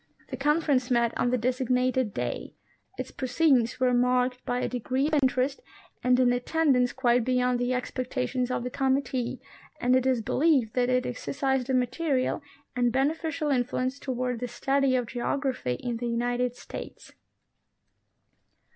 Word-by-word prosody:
The - - -2
Conference 285 -2 +1
met 235 -2 +2
on 245 - +1
the 250 - +2
designated 255 0 +1
day; - - -4 0.4
its 255 - -5
pro 260 - -4
ceedings 250 -3 +2
were 255 -1 +3
marked 250 +1 +1
by 245 - 0
a - - -1
degree 255 +2 -1
of 310 - -1
interest 260 +1 +1 0.4
and 250 0 +4
an 250 -1 +4
attendance 250 -1 +2
quite 245 -2 +2
beyond 250 0 +1
the 245 +1 0
expectations 255 0 -2
of 250 - -2
the 250 - -4
committee, 265 -2 -1 0.4
and 250 +1 +3
it 260 0 +2
is 250 -4 +1
be - - -4
lieved 275 -7 +3
that 250 -1 +1
it 255 0 +2
exercised 265 0 -2
a 260 - +2
material 255 +3 0 0.3
and 245 -1 +2
beneficial 300 +3 0
influence 255 +1 -1
toward 250 -3 -2
the 245 - -3
study 270 +2 +1
of 250 -1 +1
geograjDhy 250 - -2
in 240 -2 -3
the 240 +1 -3
United 245 +1 -1
States. - - -9
255 Hz, 155 wpm, -27 LUFS, 245-265 Hz, 0.4 s, and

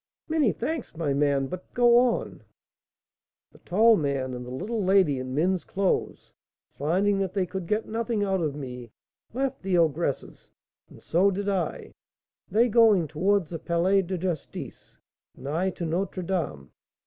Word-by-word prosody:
"Many 305 -8 +2
thanks, 260 - -4
my 155 -4 0
man; 140 -1 +1
but 180 +6 -8
go 240 0 +6
on." 245 -1 0 1.1
"The - - -19
tall 220 +5 +4
man 140 -6 -1
and 125 0 -6
the 125 - -9
little 205 - -3
lady 185 -8 +3
in 130 0 -5
men's 180 +4 +1
clothes, 195 -1 -2 0.4
finding 190 +7 +1
that 190 -1 -2
they 190 -2 +1
could 180 -1 -6
get 215 +3 -1
nothing 225 -1 -1
out 190 -2 0
of 150 -3 -1
me, 125 -4 -7 0.4
left 265 +2 -2
the 190 -2 +1
ogress's, 160 -3 -1 0.4
and - - -16
so 185 +5 +3
did 200 +1 -3
I; 190 -5 -2 0.6
they 225 +5 +3
going 215 -7 +4
towards 180 +3 0
the 165 - -4
Palais 175 +4 +2
de 185 0 -4
Justice, 175 -4 -6 0.4
and 135 - -9
I 170 +6 0
to 175 -2 -5
Notre 180 +3 -2
Dame. 165 - -3
185 Hz, 160 wpm, -26 LUFS, 155-205 Hz, 1.1 s, go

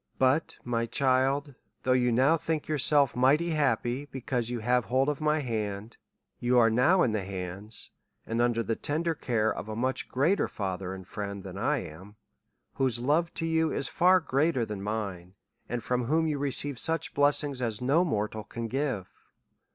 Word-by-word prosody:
But, 130 +5 +2
my 115 -1 -1
child, 135 +3 +1 0.3
though 130 - +1
you 125 -1 +3
now 130 +7 +4
think 160 -1 -2
yourself 145 -3 +3
mighty 145 +7 +3
happy, 135 -3 0
because 125 -4 -3
you 120 - -2
have 120 +1 +1
hold 130 +3 +1
of 150 0 -3
my 150 0 +2
hand, 110 -3 -4 0.4
you 125 +1 +2
are 115 -2 +5
now 140 +11 +4
in 120 - +2
the 110 -1 -1
hands, 95 +3 -6 0.3
and 115 +1 -1
under 120 -1 +1
the 115 - -1
care 145 -9 0
of 100 - -7
a 110 - -4
much 130 +3 -2
greater 155 +10 +2
Father 95 -2 -4
and 95 -1 -11
Friend 100 -2 -5
than 95 -1 -8
I 135 0 0
am, 95 +7 -13 0.6
whose 130 -3 0
love 150 +8 +1
to 165 - -2
you 160 -1 +1
is 135 - 0
far 185 +2 +4
greater 140 -4 +1
than 105 -3 -6
mine, 100 -4 -4 0.3
and 120 -1 -3
from 125 +1 -1
whom 160 +5 +2
you 150 -3 -1
re 140 0 0
ceive 140 -1 0
such 165 0 -1
blessings 145 -1 +2
as 115 -3 -1
no 140 +8 +3
mortal 110 - -2
can 115 +3 -5
give. 130 -8 -2
125 Hz, 180 wpm, -28 LUFS, 110-145 Hz, 0.6 s, are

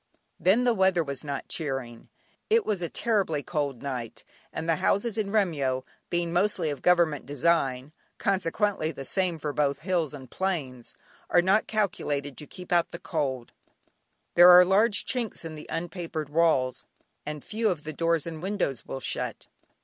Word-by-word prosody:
Then 195 +8 +4
the 245 -1 +3
weather 190 -4 +3
was 140 -3 -5
not 140 -2 -4
cheering. 135 -7 -3 0.4
It 450 +1 +3
was 205 -4 -1
a 170 - -2
terribly 195 -11 0
cold 145 -6 -3
night, 125 -4 -5 0.3
and 160 - -5
the 165 -2 +2
houses 210 +2 +1
in 215 -3 -1
Remyo, 150 -11 +1 0.3
being 175 -1 -1
mostly 180 -3 +1
of 145 - -6
Government 170 -7 +3
design, 140 -2 +1 0.3
consequently 190 -2 0
the 135 -3 -8
same 180 +1 0
for 150 -1 -4
both 140 -1 0
hills 170 -4 -1
and 130 -3 -11
plains, 140 -11 -3 0.3
are 175 - +4
not 195 +4 +3
calculated 145 -10 -1
to 150 - -9
keep 180 -2 -11
out 175 -1 +3
the - - -7
cold; 135 -8 -3 0.8
there 175 +1 +9
are 180 0 +10
large 205 +3 +3
chinks 235 -8 -3
in 160 - -6
the 155 -1 -9
unpapered 165 -3 -4
walls, 145 -5 +1 0.4
and 150 -1 -6
few 220 0 0
of 165 -6 -2
the 155 - -6
doors 165 0 +1
and 160 -2 -6
windows 185 - -2
will 135 - -5
shut. - - -4
165 Hz, 165 wpm, -27 LUFS, 145-190 Hz, 0.8 s, are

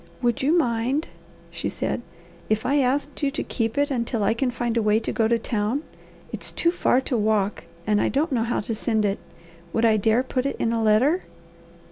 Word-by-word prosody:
"Would 240 -2 +1
you 300 +6 +3
mind," 255 +2 0 0.4
she - - -3
said, - - -2 0.5
"if 215 0 0
I 285 +3 +3
asked 280 +3 0
you 285 - +2
to 285 - -3
keep 225 +1 -2
it 285 0 +2
until 235 -3 -1
I 200 - +3
can 250 +3 0
find 240 -1 -2
a 230 - +2
way 210 0 +3
to 225 - -2
go 225 -2 +2
to 235 +1 +3
town? 225 +5 -1 0.5
It's - - -3
too 340 - +2
far 265 -7 +2
to 260 - -2
walk 210 -2 0 0.2
and 210 -1 +2
I - - +2
don't 300 +5 0
know 245 -4 +1
how 235 +1 0
to 225 - -4
send 220 -1 0
it. 200 0 0 0.5
Would 225 - +2
I 220 -1 +4
dare 220 +4 +2
put 260 0 -1
it - - -2
in 230 - 0
a 230 - 0
letter?" 240 +12 +3
235 Hz, 215 wpm, -24 LUFS, 220-270 Hz, 0.5 s, I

